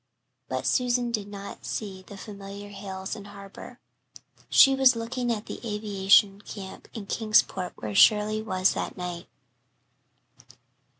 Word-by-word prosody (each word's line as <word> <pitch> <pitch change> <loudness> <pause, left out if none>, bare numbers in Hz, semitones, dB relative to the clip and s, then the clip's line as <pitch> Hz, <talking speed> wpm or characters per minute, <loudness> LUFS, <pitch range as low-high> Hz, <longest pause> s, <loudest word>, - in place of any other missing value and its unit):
But - - -3
Susan 245 -1 +1
did 210 -3 -2
not 200 -1 -9
see 195 -3 -5
the 195 +1 -12
familiar 200 0 -9
hills 195 -1 -6
and 205 -2 -10
harbour. 200 +4 -11 0.7
She 270 - +7
was 265 -2 +5
looking 240 +1 -2
at 215 -2 -3
the - - -7
aviation 205 -2 +3
camp 195 -3 -9
in 215 -3 -6
Kingsport 210 -4 +1
where 105 -1 -6
Shirley 215 - +5
was 185 -3 +1
that - - -4
night. 180 -1 -5
205 Hz, 130 wpm, -27 LUFS, 195-225 Hz, 0.7 s, She